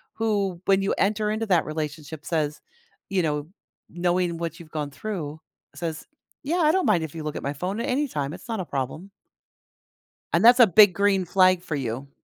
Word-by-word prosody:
who, 200 -5 -1
when 195 0 +3
you 195 - +1
enter 210 +1 +1
into 220 +1 -2
that 180 -5 +3
relationship 155 0 -5
says 155 -3 -1 0.5
you 190 -2 +1
know, 150 -1 -1 0.4
knowing 175 0 0
what 170 0 -5
you've 165 - -12
gone 150 -2 -4
through, 160 -3 -5 0.4
says, 165 -2 -5 0.4
"Yeah, 320 +6 -1
I 315 -3 +4
don't 375 +1 +1
mind 185 -7 +3
if 160 0 -7
you 160 - -5
look 150 -1 -4
at - - -4
my 140 +1 -2
phone 185 +8 -4
at 235 - -2
any 285 +3 +1
time, 145 - -3
it's - - -11
not 225 -3 -2
a 180 - -3
problem." 140 +8 -4 1.2
And 170 +5 +3
that's 245 +2 +8
a 240 - +9
big 200 0 +7
green 200 -1 +2
flag 185 0 +4
for 165 -4 -4
you. 135 +1 -4
175 Hz, 200 wpm, -25 LUFS, 155-205 Hz, 1.2 s, a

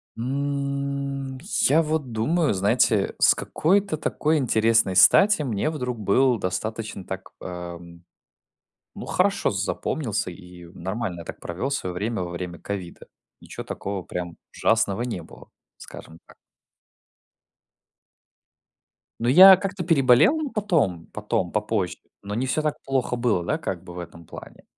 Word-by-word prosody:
М, 140 +1 -3 0.3
я 155 +5 +4
вот 155 -5 -2
думаю, 145 +7 +1
знаете, 100 +1 +2
с - - +5
какой-то 195 0 0
такой 155 +1 0
интересной 115 -6 +2
стати 195 - +6
мне 120 +1 -1
вдруг 125 -6 -4
был 120 +4 +2
достаточно 105 +2 -4
так, 95 0 -7
эм, 85 -1 -8 0.9
ну, - - -8
хорошо - - +1
запомнился, 110 -10 -2
и 90 -1 -13
нормально 95 0 -4
я - - -8
так - - -9
провел 95 +11 -4
свое 95 -10 -3
время 105 +2 -2
во 90 - -5
время 85 0 -6
ковида. 95 -4 -7 0.3
Ниче - - -8
такого 100 -1 -5
прям 85 -1 -6 0.2
ужасного 110 -1 +1
не 120 -8 -4
было, - - -15 0.3
скажем 80 - -12
так. - - -18 2.9
Ну, 120 - -1
я 185 +9 +10
как-то 195 -1 -4
переболел 165 - +4
потом 165 - 0
потом, 105 -4 -2
попозже, 105 -4 -1 0.2
но 100 +1 -5
не 125 +4 -1
всё 130 +4 0
так 150 -1 -1
плохо 130 -2 -1
было, 120 -7 0
да, - - -1
как 90 -2 -5
бы 90 - -11
в 90 - -7
этом 85 -1 -10
плане. - - -12
115 Hz, 135 wpm, -24 LUFS, 95-140 Hz, 2.9 s, я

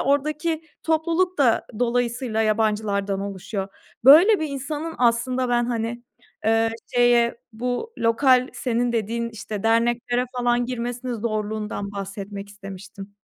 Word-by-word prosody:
oradaki 305 +4 0 0.2
topluluk 330 +2 +1
da 245 -5 +3
dolayısıyla 240 -1 0
yabancılardan 210 -2 0
oluşuyor. 200 0 -4 0.4
Böyle 340 +9 +8
bir 310 - -1
insanın 295 +4 -4
aslında 250 +1 +1
ben, 240 0 +2
hani, 235 0 -3 0.4
eee, 225 +1 +3 0.2
şeye 240 -1 +4
bu 250 - -3
lokal, 255 +2 +3
senin 245 -1 -1
dediğin, 230 +1 -1
işte, 210 -2 -6
derneklere 240 +2 +1
falan 245 0 +2
girmesinin 245 0 -3
zorluğundan 215 -2 -3
bahsetmek 200 0 -6
istemiştim. 200 0 -10
235 Hz, 115 wpm, -23 LUFS, 215-255 Hz, 0.4 s, Böyle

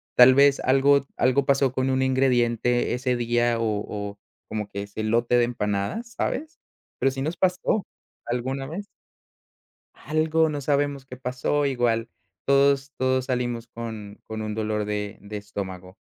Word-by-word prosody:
tal 125 +1 +8
vez 140 0 +5
algo 140 +2 +4 0.2
algo 130 +2 +3
pasó 135 -2 +3
con 130 0 0
un 130 0 +2
ingrediente 125 -2 +2
ese 125 0 0
día 120 0 +1
o - - 0
o 105 -1 -3 0.3
como 105 -1 -4
que 100 0 -5
ese 100 +2 -6
lote 120 +3 +2
de 120 - +4
empanadas, 115 - -2
¿sabes? 315 +3 -3 0.4
Pero 135 - +3
sí 135 0 -4
nos 160 +3 -2
pasó 185 +3 +1 0.4
alguna 130 +3 -2
vez. 185 +7 -6 1.1
Algo, 155 +2 +1
no 145 -1 -3
sabemos 140 -1 0
qué 125 - -9
pasó, 130 +3 -1
igual 120 -3 0 0.4
todos 140 0 +3
todos 130 0 +1
salimos 120 -2 -2
con 110 -3 -8
con 110 0 -6
un 105 -1 -3
dolor 105 -1 -1
de 105 -1 -4
de 105 +1 -7
estómago, 95 -1 -7
125 Hz, 155 wpm, -25 LUFS, 110-140 Hz, 1.1 s, tal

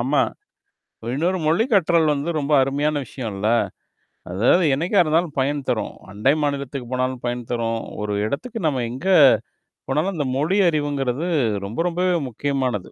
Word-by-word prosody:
ஆமா. 135 +4 +2 0.9
இன்னொரு 180 +6 0
மொழிக் 225 - +1
கற்றல் 170 -5 +4
வந்து 145 +4 -2
ரொம்ப 145 +1 -2
அருமையான 145 +2 0
விஷயம் 120 -1 -6
இல்ல. 105 +3 -1 0.8
அதாவது 120 - +3
என்னைக்கா 175 +8 0
இருந்தாலும் 160 0 0
பயன் 145 +2 0
தரும். - - -1 0.2
அண்டை 105 +8 +2
மாநிலத்துக்கு 140 -3 -3
போனாலும் 130 0 -1
பயன் 120 0 -3
தரும். 115 -1 -1 0.2
ஒரு 105 0 -2
இடத்துக்கு 225 - -4
நம்ம 135 -5 0
எங்க 130 +9 -7 0.8
போனாலும் 160 +8 0
இந்த 145 - -1
மொழி 160 +8 +1
அறிவுங்கிறது 145 -1 -1 0.4
ரொம்ப, 110 +10 -6
ரொம்பவே 180 +1 +1
முக்கியமானது. 130 -5 -2
140 Hz, 140 wpm, -22 LUFS, 125-165 Hz, 0.9 s, கற்றல்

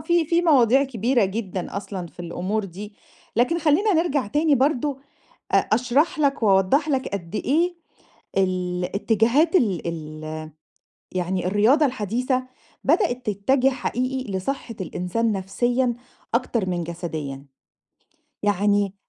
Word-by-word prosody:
في 340 +2 +2
في 340 +2 +2
مواضيع 270 -4 +5
كبيرة 240 -2 +1
جدًا 190 -2 -4
أصلًا 195 -3 -5
في 175 - -13
الأمور 185 +5 -2
دي، 205 +3 -9 0.4
لكن 250 +9 +2
خلّينا 330 +7 +3
نرْجع 310 -7 +1
تاني 295 +7 +2
برضه 275 +1 +1 0.5
أ - - +3
أشرح 250 +9 +1
لك 275 -5 +1
وأوضّح 200 +9 +3
لك 270 -2 0
قد 185 -2 -5
إيه 335 +10 +1 0.6
الاتجاهات 195 - +1
ال 195 - +2
ال 155 -1 -6 0.7
يعني 180 0 -1
الرياضة 220 +11 +4
الحديثة 250 +2 -1 0.4
بدأت 255 -4 +1
تتّجه 255 +7 +2
حقيقي 255 -2 -3
لصحة 230 +5 -3
الإنسان 190 +5 -1
نَفسيًا، 240 +6 0 0.4
أكتر 235 -4 0
من 175 -1 -2
جسديًا، 155 -5 -5 1.0
يعني 205 0 +2
225 Hz, 115 wpm, -23 LUFS, 185-270 Hz, 1.0 s, مواضيع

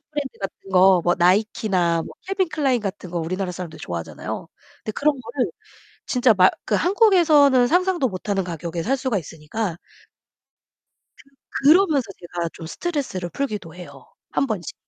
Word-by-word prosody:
브랜드 290 -3 -5
같은 195 0 -7
거 185 0 +6
뭐 175 - +3
나이키나 180 -2 +2
뭐 - - -10
캘빈클라인 315 -10 0
같은 195 -3 -5
거 175 - -2
우리나라 180 +3 -3
사람들 170 -3 -7
좋아하잖아요. 85 -1 -6 0.4
근데 215 - -3
그런 285 0 +1
거를 245 +2 -2 0.6
진짜 250 -2 +4
말 185 -1 +6
그 - - -1
한국에서는 325 - +5
상상도 355 -2 +2
못하는 195 0 -2
가격에 170 0 -4
살 265 +9 +1
수가 260 -5 -1
있으니까 165 +4 -5 1.7
그 275 - -1
그러면서 315 -6 +5
제가 175 -1 -4
좀 165 - -9
스트레스를 265 - -3
풀기도 210 - -4
해요 145 -7 -12 0.3
1 275 - +1
번씩. 200 - -4
205 Hz, 340 characters per minute, -22 LUFS, 175-280 Hz, 1.7 s, 거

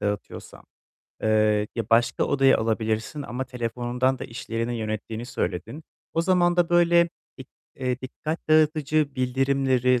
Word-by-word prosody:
dağıtıyorsa, 105 -1 -5 0.6
eee, 105 -1 +2
ya 115 - -2
başka 115 +1 +3
odaya 135 -1 +4
alabilirsin 110 +5 -1
ama 130 -1 -4
telefonundan 125 +1 -1
da - - -6
işlerini 115 0 -4
yönettiğini 110 +1 -4
söyledin. 105 - -4 0.3
O 165 - +2
zaman 175 -1 +3
da 175 -1 +3
böyle 170 0 +4 0.3
i 130 - -8 0.3
eee, 130 -1 -2
dikkat 155 +6 -6
dağıtıcı 155 -2 +2
bildirimleri, 130 -1 +1
125 Hz, 125 wpm, -25 LUFS, 115-150 Hz, 0.6 s, odaya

